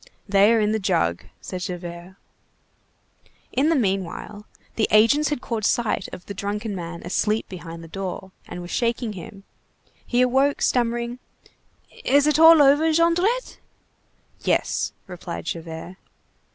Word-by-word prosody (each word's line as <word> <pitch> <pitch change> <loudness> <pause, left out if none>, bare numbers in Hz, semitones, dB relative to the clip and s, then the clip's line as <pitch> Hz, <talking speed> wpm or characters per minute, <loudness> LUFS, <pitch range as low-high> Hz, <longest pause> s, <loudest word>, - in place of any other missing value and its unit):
"They 200 +2 +5
are 230 - +4
in 210 0 +1
the 220 - 0
jug," 85 - 0 0.2
said 185 -1 -6
Javert. 175 0 -7 1.4
In 280 +5 +2
the 330 - +3
meanwhile, 205 - -2 0.3
the 220 - +1
agents 230 +8 +4
had 295 -5 -2
caught 225 -2 -3
sight 225 -3 0
of 180 - -10
the 200 - -6
drunken 205 +2 -4
man 170 -1 -7
asleep 210 +5 0
behind 170 -2 -9
the - - -10
door, 190 +1 -6 0.2
and 175 - -7
were 175 - -8
shaking 235 +2 -1
him:— 195 +2 -10 0.6
He 245 0 +1
awoke, 265 +3 +2
stammering:— 240 0 0 0.8
"Is 285 +1 +4
it 300 +1 +2
all 325 -2 +9
over, 290 +4 +4
Jondrette?" 350 +9 +1 0.8
"Yes," - - 0
replied 180 -3 -7
Javert. 165 +2 -6
210 Hz, 140 wpm, -23 LUFS, 180-255 Hz, 1.4 s, all